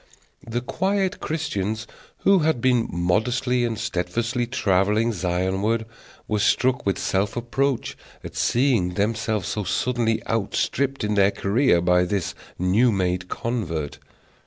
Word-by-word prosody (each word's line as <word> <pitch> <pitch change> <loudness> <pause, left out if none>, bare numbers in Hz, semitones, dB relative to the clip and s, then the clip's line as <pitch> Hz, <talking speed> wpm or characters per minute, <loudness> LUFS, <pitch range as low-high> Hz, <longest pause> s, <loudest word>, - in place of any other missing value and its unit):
The 120 +2 -2
quiet 190 +7 -1
Christians 110 - -2 0.4
who 195 -1 +5
had 155 -5 +1
been 125 -1 +2
modestly 120 +8 +1
and 115 -2 -1
steadfastly 115 +4 -1
travelling 105 -1 +2
Zionward 95 +5 0 0.4
were 105 -1 0
struck 125 +3 +2
with 100 - +1
self 95 +1 0
reproach 125 +2 -1 0.3
at - - -8
seeing 115 -9 +2
themselves 110 0 -1
so 105 +1 -2
suddenly 115 +4 0
outstripped 130 +5 -1
in 105 0 0
their 100 -1 +4
career 100 -1 +2
by 90 +1 +3
this 95 -1 -2 0.2
new 100 +7 +3
made 90 -2 -1
convert. 85 - -3
110 Hz, 125 wpm, -23 LUFS, 95-125 Hz, 0.4 s, who